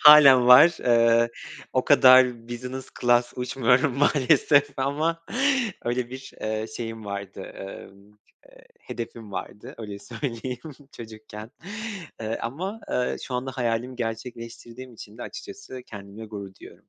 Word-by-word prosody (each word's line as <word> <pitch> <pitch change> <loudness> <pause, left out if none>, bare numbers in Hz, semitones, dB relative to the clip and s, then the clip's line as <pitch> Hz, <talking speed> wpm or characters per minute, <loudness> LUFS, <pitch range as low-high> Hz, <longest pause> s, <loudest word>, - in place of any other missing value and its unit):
Hâlen 140 -5 +9
var, 160 +7 +8
ııı, 115 -1 +4 0.4
o - - +1
kadar 125 -2 +6
business 125 +2 -6
class 120 0 +3
uçmuyorum 125 +1 +1
maalesef 145 0 +4
ama 155 +5 -1 0.6
öyle 120 0 -2
bir, 130 +1 -9
ııı, 110 0 -2
şeyim 115 -1 -6
vardı, 100 -1 -6 0.2
ımm, 100 0 -10
ııı, 105 - -25 0.6
hedefim 115 -3 -8
vardı 105 - -7
öyle 105 -3 -7
söyleyeyim 120 +1 -5 0.4
çocukken. 110 -1 -10 0.7
Iıı, 110 +1 -3
ama, 185 - -4
ııı, 125 0 0
şu 130 - -6
anda 125 +2 -2
hayalimi 125 0 -2
gerçekleştirdiğim 115 +2 -7
için 105 +1 -12
de - - -6
açıkçası 390 - -9
kendimle 100 +1 -10
gurur 100 -2 -8
duyuyorum. - - -13
120 Hz, 125 wpm, -25 LUFS, 110-130 Hz, 0.7 s, Hâlen